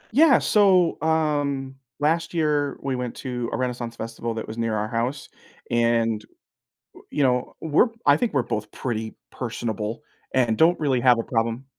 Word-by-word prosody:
Yeah, 300 -3 +7
so, 185 -7 +3
um, 145 -4 0 0.3
last 165 +3 0
year, 150 -3 +1
we 135 -2 -1
went 125 -1 -4
to 125 -2 -4
a - - -2
Renaissance 120 -2 -3
Festival 115 0 -5
that 110 - -5
was 110 +2 -7
near 115 -1 0
our 105 0 -1
house, 120 +5 -2 0.4
and, 115 -2 +2 0.7
we - - -14
you 145 - -1
know, 125 -2 +1
we're 160 +9 +3 0.2
I - - +7
think 240 -8 -1
we're 135 - +3
both 105 -2 -4
pretty 110 -3 -4 0.2
personable 110 -2 -4 0.3
and 120 -4 +2
don't 170 +2 +5
really 135 -5 +1
have 125 -3 +5
a - - -1
problem, 115 +2 -1
125 Hz, 170 wpm, -24 LUFS, 115-150 Hz, 0.7 s, Yeah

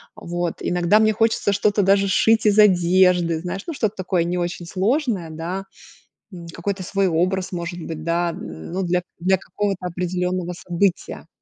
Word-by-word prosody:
Вот. 175 -1 -3
Иногда 180 +4 +2
мне 215 0 +3
хочется 225 -2 +1
что-то 205 +1 +2
даже 195 +1 +3
сшить 220 +2 +3
из 210 0 +4
одежды, 180 -3 +4
знаешь, 180 +3 -5
ну, 330 - -3
что-то 215 -6 -1
такое 185 -2 0
не 175 +1 -2
очень 175 0 -3
сложное, 200 - -1
да, 170 +5 -5 0.7
м, 170 -2 -9
какой-то 190 +3 -4
свой 195 +1 0
образ, 185 +3 0
может 175 0 -5
быть, 160 -1 -6
да, 170 +1 0
ну, 80 - -6
для 180 0 0 0.2
для 190 +1 +2
какого-то 195 -3 -3
определённого 180 0 -2
события. 175 +1 -2
180 Hz, 160 wpm, -22 LUFS, 175-200 Hz, 0.7 s, из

